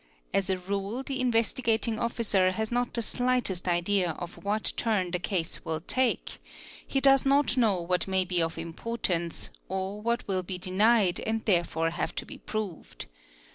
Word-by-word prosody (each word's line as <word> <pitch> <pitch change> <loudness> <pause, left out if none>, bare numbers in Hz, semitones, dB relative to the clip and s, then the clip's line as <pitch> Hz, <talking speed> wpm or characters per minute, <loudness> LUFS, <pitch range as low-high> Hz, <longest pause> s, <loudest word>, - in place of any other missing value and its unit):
As 195 -1 +1
a 190 - +3
r 200 +6 -3
the 270 -1 -3
Investigating 230 -2 +1
Officer 215 -5 +2
has 220 +3 -2
not 245 0 0
the 235 - -1
slightest 245 -8 0
idea 175 0 +2
of 175 +1 -8
what 210 +2 0
turn 200 -6 0
the 180 - 0
cas 175 -3 -2
will 160 -1 -2
take, 255 +7 -1 0.5
he 270 - +1
does 270 0 +6
not 275 -1 +3
know 220 -7 +3
what 175 +1 0
may 190 -1 +2
be 180 -1 +1
of 165 0 -1
importance, 170 0 -2 0.2
or 190 +2 -3
what 235 +1 -1
will 190 -2 0
bi 185 0 -5
denied 190 +1 +3
and 225 0 -2
therefore 170 -4 +1
have 170 - -3
to - - -3
be - - -10
proved. 215 -6 -5
200 Hz, 170 wpm, -28 LUFS, 180-235 Hz, 0.5 s, does